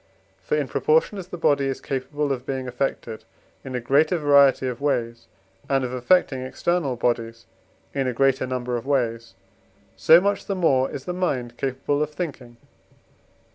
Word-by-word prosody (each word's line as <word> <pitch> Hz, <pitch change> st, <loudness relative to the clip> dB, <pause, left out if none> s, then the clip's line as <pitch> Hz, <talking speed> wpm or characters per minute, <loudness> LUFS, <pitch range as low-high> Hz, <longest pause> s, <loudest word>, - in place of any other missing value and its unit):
For, 470 Hz, -, -1 dB
in -, -, -1 dB
proportion 455 Hz, -, +1 dB
as 180 Hz, -, -8 dB
the 180 Hz, -, -7 dB
body 140 Hz, -4 st, +2 dB
is 135 Hz, -, -3 dB
capable 140 Hz, +2 st, -3 dB
of 125 Hz, -2 st, -3 dB
being 130 Hz, -1 st, -4 dB
affected 125 Hz, -3 st, -3 dB, 0.4 s
in 130 Hz, -1 st, -6 dB
a -, -, 0 dB
greater 145 Hz, +8 st, +2 dB
variety 140 Hz, -3 st, +4 dB
of 125 Hz, 0 st, -5 dB
ways, 120 Hz, -5 st, -2 dB, 0.4 s
and 135 Hz, -1 st, +2 dB
of 125 Hz, -, -5 dB
affecting 130 Hz, +1 st, +2 dB
external 140 Hz, +1 st, -1 dB
bodies 115 Hz, -1 st, -2 dB, 0.5 s
in 135 Hz, -2 st, -1 dB
a -, -, 0 dB
great 135 Hz, +1 st, +2 dB
number 125 Hz, -1 st, -2 dB
of 120 Hz, -, -8 dB
ways, 115 Hz, -6 st, -1 dB, 0.6 s
so 165 Hz, +2 st, +6 dB
much 200 Hz, +2 st, -1 dB
the 195 Hz, -, -1 dB
more 135 Hz, -8 st, +2 dB
is 135 Hz, -, -7 dB
the 180 Hz, -, -3 dB
mind 130 Hz, -10 st, -2 dB
capable 135 Hz, +3 st, -2 dB
of 150 Hz, -, 0 dB
thinking 135 Hz, -8 st, -6 dB
(IV. -, -, -29 dB
135 Hz, 175 wpm, -23 LUFS, 125-150 Hz, 0.6 s, so